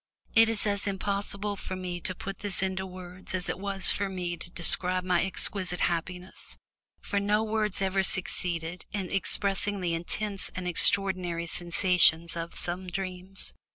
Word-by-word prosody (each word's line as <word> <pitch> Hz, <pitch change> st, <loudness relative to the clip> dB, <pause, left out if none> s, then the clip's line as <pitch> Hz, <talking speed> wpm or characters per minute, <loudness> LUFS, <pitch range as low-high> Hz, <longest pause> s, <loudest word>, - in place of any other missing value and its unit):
It 225 Hz, 0 st, +5 dB
is 225 Hz, -2 st, +1 dB
as 205 Hz, 0 st, 0 dB
impossible 200 Hz, +1 st, -2 dB
for 190 Hz, -1 st, -6 dB
me 180 Hz, -1 st, -5 dB
to 185 Hz, -, -2 dB
put 195 Hz, +2 st, -7 dB
this 200 Hz, -2 st, +1 dB
into 190 Hz, 0 st, -3 dB
words 185 Hz, 0 st, -5 dB
as 180 Hz, -, 0 dB
it -, -, -3 dB
was 195 Hz, -1 st, +3 dB
for 200 Hz, 0 st, -1 dB
me 180 Hz, -2 st, -4 dB
to 175 Hz, -, -8 dB
describe 180 Hz, +1 st, +1 dB
my 180 Hz, -1 st, +1 dB
exquisite 190 Hz, -1 st, 0 dB
happiness, 180 Hz, +2 st, -4 dB, 0.4 s
for 200 Hz, -, -2 dB
no 210 Hz, +2 st, +1 dB
words 215 Hz, -3 st, -1 dB
ever 195 Hz, 0 st, +1 dB
succeed 180 Hz, -3 st, +1 dB, 0.3 s
in 195 Hz, -4 st, -4 dB
expressing 200 Hz, +1 st, +1 dB
the 175 Hz, -2 st, -2 dB
intense 195 Hz, +4 st, -3 dB
and 180 Hz, 0 st, -4 dB
extraordinary 180 Hz, -1 st, +4 dB
sensations 170 Hz, -1 st, +4 dB
of 165 Hz, 0 st, -6 dB
some 180 Hz, +2 st, -2 dB
dreams. 185 Hz, +1 st, -5 dB
185 Hz, 155 wpm, -28 LUFS, 180-200 Hz, 0.4 s, It